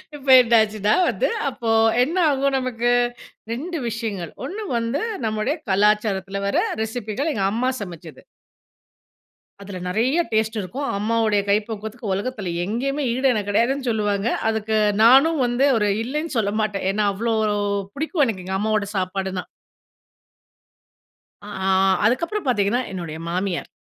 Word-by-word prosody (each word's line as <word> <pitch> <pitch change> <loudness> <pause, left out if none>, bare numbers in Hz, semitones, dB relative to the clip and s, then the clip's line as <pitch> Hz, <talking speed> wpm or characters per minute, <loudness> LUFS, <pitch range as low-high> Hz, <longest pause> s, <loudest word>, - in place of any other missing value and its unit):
இப்ப 280 -1 -12
என்னாச்சுன்னா 215 -3 +2 0.2
வந்து, - - 0 0.2
அப்போ 235 -3 -5 0.3
என்ன 330 +8 -2
ஆகும் 275 0 +1
நமக்கு? 240 -1 -1 0.6
2 335 +7 -4
விஷயங்கள். 210 -7 -4
1 425 +3 -5
வந்து 230 +6 -1 0.2
நம்முடைய 220 +7 -1 0.2
கலாச்சாரத்தில 200 -1 +1
வர - - 0 0.3
ரெசிபிகள். 225 +6 -3
எங்க 195 - -1
அம்மா 250 +3 0
சமைச்சது. 170 -4 -9 1.4
அதில 195 -2 -7
நெறைய 245 - +1
டேஸ்ட் 220 0 0
இருக்கும். 260 +10 -4
அம்மாவோட 220 0 +1 0.2
கைப்பக்குவத்துக்கு 215 +1 -2
உலகத்தில 200 -3 -3
எங்கேயுமே 275 +8 -2
ஈடு 260 +2 0
எனக்கு 205 -2 -2
கெடையாதுன்னு 250 +5 +1
சொல்லுவாங்க. 205 -1 0 0.2
அதுக்கு 220 0 -1 0.3
நானும் 275 +7 +6
வந்து, 245 +4 +2
ஒரு 210 -1 +1
இல்லன்னு 300 +5 -3
சொல்ல 205 -2 0
மாட்டேன். 205 -3 -2
ஏன்னா 210 +1 0
அவ்ளோ 225 +3 -1 0.6
பிடிக்கும் 315 0 +1
எனக்கு. 190 -5 -4
எங்க 190 0 -2
அம்மாவோட 215 -1 0
சாப்பாடுனா! 190 0 -2 2.0
அ 205 - -11 0.2
ஆ, - - +2 0.4
அதுக்கப்புறம் 335 - -1
பாத்தீங்கன்னா 235 +2 +1
என்னுடைய 170 -4 -5
மாமியார்! 180 +1 -2
220 Hz, 125 wpm, -22 LUFS, 200-255 Hz, 2.0 s, நானும்